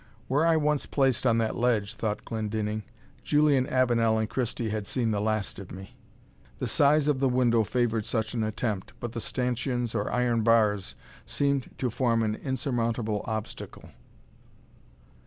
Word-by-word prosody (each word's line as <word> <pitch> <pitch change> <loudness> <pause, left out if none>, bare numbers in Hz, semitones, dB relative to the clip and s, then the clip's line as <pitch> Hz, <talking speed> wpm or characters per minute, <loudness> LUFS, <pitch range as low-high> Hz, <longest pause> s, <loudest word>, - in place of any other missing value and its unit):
"Were 150 +5 +2
I 165 -1 +4
once 150 -2 +1
placed 135 -2 +1
on 115 -1 +3
that 115 -1 0
ledge," 115 -4 +1
thought 110 -1 -3
Glendinning, 110 -1 -2 0.4
"Julian 145 -3 +3
Avenel 120 -3 +2
and 110 0 0
Christie 120 -2 -2
had 105 -2 -3
seen 120 -4 0
the 105 -1 0
last 110 -2 -1
of 100 - -9
me." 95 +1 -10 0.6
The - - -3
size 145 +1 +3
of 145 -3 +2
the 135 -1 +2
window 120 -2 +3
favoured 115 -1 0
such 110 -1 -2
an 115 - -1
attempt, 110 -2 -3
but 120 - -4
the 115 - -4
stanchions 125 0 -2
or 105 -2 -1
iron 120 -2 +1
bars 105 -3 +2 0.3
seemed 140 -2 0
to 125 -3 -1
form 115 -1 +1
an 105 -1 0
insurmountable 115 -4 -1
obstacle. 110 -1 -6
115 Hz, 155 wpm, -27 LUFS, 110-130 Hz, 0.6 s, I